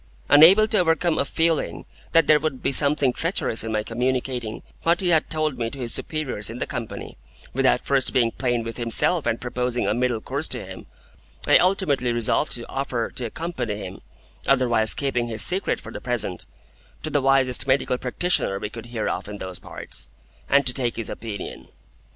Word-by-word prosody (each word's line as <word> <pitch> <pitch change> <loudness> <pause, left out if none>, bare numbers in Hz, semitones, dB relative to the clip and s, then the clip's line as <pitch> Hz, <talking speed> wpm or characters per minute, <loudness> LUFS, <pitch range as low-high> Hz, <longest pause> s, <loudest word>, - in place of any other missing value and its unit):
Unable 180 +9 +8
to 215 - +2
overcome 165 -1 +2
a - - +2
feeling 145 - 0 0.3
that 165 - +5
there 155 -1 +5
would 150 -4 -3
be - - +1
something 140 -2 +4
treacherous 165 - -2
in 115 - -4
my 110 -1 0
communicating 125 -1 -2 0.2
what 170 +1 +2
he 185 - +1
had 160 -3 +2
told 155 -4 -1
me 115 -1 -1
to 140 - -9
his 120 -3 -2
superiors 140 -10 -3
in 115 - -6
the - - -2
Company, 115 -2 -7 0.3
without 130 -1 +2
first 135 -2 +2
being 120 -3 +2
plain 120 -2 -1
with 115 0 -6
himself 135 +6 +2
and 115 0 0
proposing 125 0 -2
a - - +1
middle 120 -1 0
course 140 +7 -3
to 125 -6 0
him, 95 0 -10 0.6
I - - +6
ultimately 155 -10 +2
resolved 120 +5 +1
to 120 -1 -5
offer 130 -4 -3
to 125 - -3
accompany 125 -4 -4
him 95 -2 -8 0.5
(otherwise 120 -5 +3
keeping 125 -4 -1
his 110 -2 -2
secret 190 +2 -1
for - - -10
the - - -7
present) 120 -7 -3 0.6
to 155 - -4
the 145 - +2
wisest 135 -1 +2
medical 130 -1 +1
practitioner 125 - 0
we 105 +1 -5
could 115 0 -9
hear 115 -3 -3
of - - -3
in 105 - -6
those 95 -3 -6
parts, - - -9 0.4
and 140 -1 +4
to 125 - +4
take 120 -3 0
his 115 - -4
opinion. 110 -3 -7
125 Hz, 190 wpm, -23 LUFS, 115-150 Hz, 0.6 s, Unable